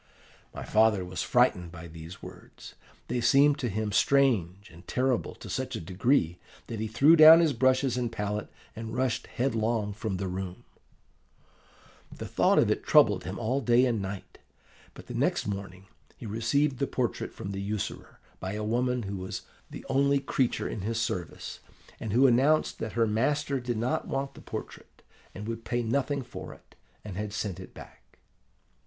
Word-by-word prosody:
"My - - -7
father 110 -3 +3
was 90 0 -4
frightened 90 -2 +2
by 85 -1 -9
these 80 +2 -11
words: - - -12 0.3
they 120 0 -1
seemed 140 +5 +4
to 125 - -1
him 105 +1 -2
strange 105 -7 +2
and 85 +2 -16
terrible 130 -1 0
to - - -11
such - - -3
a - - -3
degree, 90 - +1 0.3
that 115 - -6
he 110 - -2
threw 135 +9 +5
down 160 +1 +10
his 165 -4 +3
brushes 130 +1 +2
and 120 -2 -1
palette 105 -1 -3 0.3
and 115 0 -6
rushed 130 -2 -1
headlong 115 -4 -1
from 105 -2 -3
the 95 +1 -3
room. 95 0 -5 1.5
"The - - -7
thought - - +2
of - - +4
it - - -1
troubled - - +4
him 95 +2 -5
all 125 +4 -1
day 120 +1 +4
and 115 -5 0
all 95 - -3
night; 100 - -10 0.6
but - - -11
the - - -8
next - - 0
morning 95 -2 -6 0.3
he - - -9
received 125 +6 0
the 140 - 0
portrait 125 -3 -2
from 95 - -7
the 100 0 -4
usurer, 105 0 -4 0.2
by 95 +1 -4
a 105 0 -3
woman 125 +2 0
who 100 0 -4
was 95 0 -6 0.3
the - - -9
only 140 +1 +3
creature 130 -2 0
in 105 - -5
his 115 +3 -2
service, 90 -7 -4 0.4
and 110 - -4
who 125 +6 +5
announced 135 +5 +3
that 110 - -4
her 115 -1 +2
master 135 +6 0
did 120 -2 -3
not 120 +3 -1
want 135 0 -3
the - - -13
portrait, - - -9 0.3
and 105 +3 -7
would 115 0 -5
pay 120 0 -1
nothing 140 +4 -1
for 120 - -9
it, - - -23 0.3
and 100 -3 -7
had 105 0 -3
sent 105 -4 -3
it 95 - -11
back. - - -15
115 Hz, 180 wpm, -28 LUFS, 100-130 Hz, 1.5 s, down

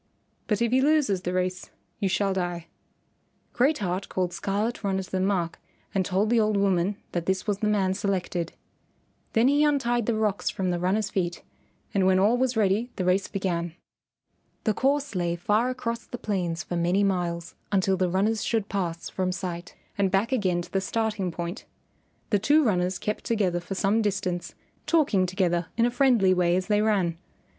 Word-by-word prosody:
But 210 +1 +1
if 235 - +1
he 260 +1 +4
loses 285 -10 +2
the 180 - -2
race 185 0 -2 0.3
you 200 -3 +1
shall 195 +1 +1
die." 175 -2 -3 0.9
Great 275 +5 +3
Heart 190 -1 -3
called 180 -1 -1
Scarlet 210 +6 -2
Runner 190 -1 0
to - - -14
the 190 - 0
mark 185 -3 0 0.3
and 195 - +2
told 195 +4 0
the 240 - +4
old 215 -1 +2
woman 195 0 +2 0.2
that 175 -1 -3
this 190 0 0
was 205 -2 -1
the 215 - 0
man 195 -3 +2
selected. 185 -3 -2 0.8
Then 225 +2 +4
he 290 +2 +4
untied 240 -6 +1
the 235 - +2
rocks 215 -2 0
from 185 -2 -1
the 175 - -1
runner's 200 +4 0
feet, 175 -2 -2 0.5
and 190 -2 +3
when 190 0 +4
all 205 +5 +4
was 255 -1 0
ready 215 +3 +2
the 185 - -2
race 185 +2 +2
began. 175 -4 -2 0.9
The 215 - +2
course 280 +3 0
lay 175 -2 0
far 210 +8 +1
across 235 -2 -3
the 245 - -6
plains 175 -7 -2
for 175 - -4
many 175 +4 +2
miles 175 -3 -1 0.2
until 195 -1 +2
the 185 -1 +1
runners 205 +4 +1
should 220 -3 -1
pass 175 -4 -2
from 185 -1 -1
sight, 180 -1 -5 0.2
and 195 -1 +3
back 195 +5 +1
again 185 -8 +1
to - - -13
the 195 - 0
starting 215 -2 -1
point. 170 +5 -5 0.7
The 205 - +3
two 295 +9 +4
runners 185 -5 +1
kept 210 - -3
together 195 -6 0
for 180 +3 -6
some 205 +4 +2
distance, 185 -4 -2 0.3
talking 270 - +3
together 175 -2 0
in 230 - +4
a 240 - +1
friendly 240 -8 +4
way 175 -1 +2
as 185 0 0
they 210 0 +2
ran. 190 -6 +1
195 Hz, 185 wpm, -26 LUFS, 180-220 Hz, 0.9 s, he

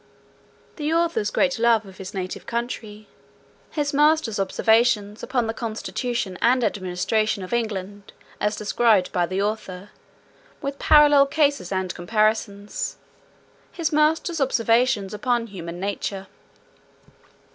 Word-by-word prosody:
The 300 0 -2
author's 335 -10 +1
great 270 -4 +1
love 230 -2 +3
of 190 -1 -14
his 190 -1 -7
native 185 -2 -5
country. 225 -3 -5 0.6
His 290 -2 -2
master's 295 -7 +3
observations 215 +1 +2
upon 250 -2 -1
the 225 - -2
constitution 230 -3 -4
and 250 +1 +3
administration 200 +1 -1
of 185 - -6
England, 205 -3 -3 0.3
as 210 0 0
described 215 -2 +2
by 175 -2 0
the 190 +2 -1
author, 205 -2 -4 0.7
with 280 -2 -5
parallel 290 -2 +6
cases 285 - +1
and 185 -1 -2
comparisons. 210 +1 -1 0.7
His 325 -3 -2
master's 315 +2 +2
observations 230 -4 +2
upon 235 +2 0
human 175 -5 -8
nature. 195 0 -3
220 Hz, 115 wpm, -23 LUFS, 200-260 Hz, 0.7 s, parallel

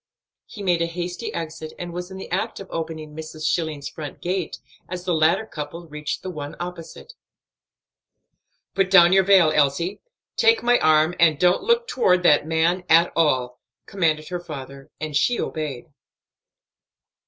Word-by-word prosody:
He 205 - -9
made 175 -3 +1
a 170 - +1
hasty 175 +5 -5
exit 160 -1 -6
and 175 -1 -6
was 180 +1 -5
in 190 - -9
the 190 - -9
act 185 - -2
of 195 - -9
opening 160 -2 -5
Mrs. 155 0 -7
Schilling's 155 -4 -1
front 150 -3 -8
gate 180 -1 -3 0.3
as 180 0 -5
the 180 -1 -1
latter 165 +7 +2
couple 165 -1 -7
reached 150 -1 -5
the 185 - -4
one 145 -3 -7
opposite. 180 - -8 1.6
"Put 195 -1 +1
down 180 -2 +7
your 195 - +6
veil, 185 -5 +5
Elsie; 150 +7 +1 0.4
take 455 0 +4
my 245 0 +4
arm; 155 +1 +3
and 160 -3 +4
don't 180 +3 +3
look 470 +3 +1
toward 185 - +2
that 150 -2 +4
man 165 +3 +1
at 165 +2 +5
all," 130 -6 +1 0.3
commanded 155 -5 -1
her 180 -1 -3
father, 140 -4 -9
and 155 -1 -5
she 240 +11 +2
obeyed. 150 -6 -4
165 Hz, 160 wpm, -23 LUFS, 155-180 Hz, 1.6 s, down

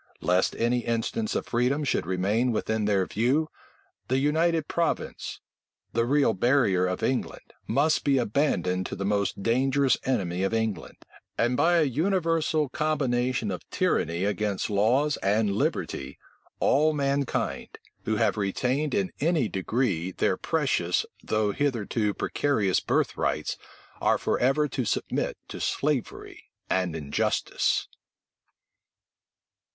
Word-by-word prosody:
Lest 90 +1 +2
any 120 +1 +1
instance 120 - -2
of - - -1
freedom 125 +5 0
should 135 - 0
remain 100 +7 +1
within 110 -1 -1
their 100 -2 +2
view, 130 +11 +1 0.6
the 130 - +1
United 160 +3 +1
Province; 170 -1 -2 0.5
the 115 +1 +2
real 140 -3 +3
barrier 100 -5 +2
of 90 0 -3
England, 130 - -2
must 155 +3 +2
be 140 -1 +3
abandoned 100 - 0
to - - -5
the 100 - -4
most 100 -1 -1
dangerous 130 +2 +2
enemy 95 -9 -1
of 95 +3 0
England; 110 -3 -2 0.4
and 120 +2 +2
by 175 +6 +3
a 165 - +4
universal 160 +1 +1
combination 130 -6 0
of 90 - -4
tyranny 85 +3 0
against 105 -1 -1
laws 125 +9 +2
and 100 +1 +1
liberty, 70 -8 -2 0.4
all 155 +3 +3
mankind, 140 -2 -1 0.3
who - - 0
have - - +1
retained 125 - 0
in 195 -2 0
any 155 -5 +2
degree 95 -3 -1
their - - +1
precious, - - 0 0.2
though 110 -1 +1
hitherto 115 -5 -1
precarious 110 -10 +1
birthrights, - - -1 0.5
are - - +3
forever 135 +4 +1
to 130 -1 -2
submit 105 - -2
to - - -7
slavery 145 -4 -2 0.2
and 90 -3 0
injustice. 75 -3 0
120 Hz, 125 wpm, -27 LUFS, 100-145 Hz, 0.6 s, a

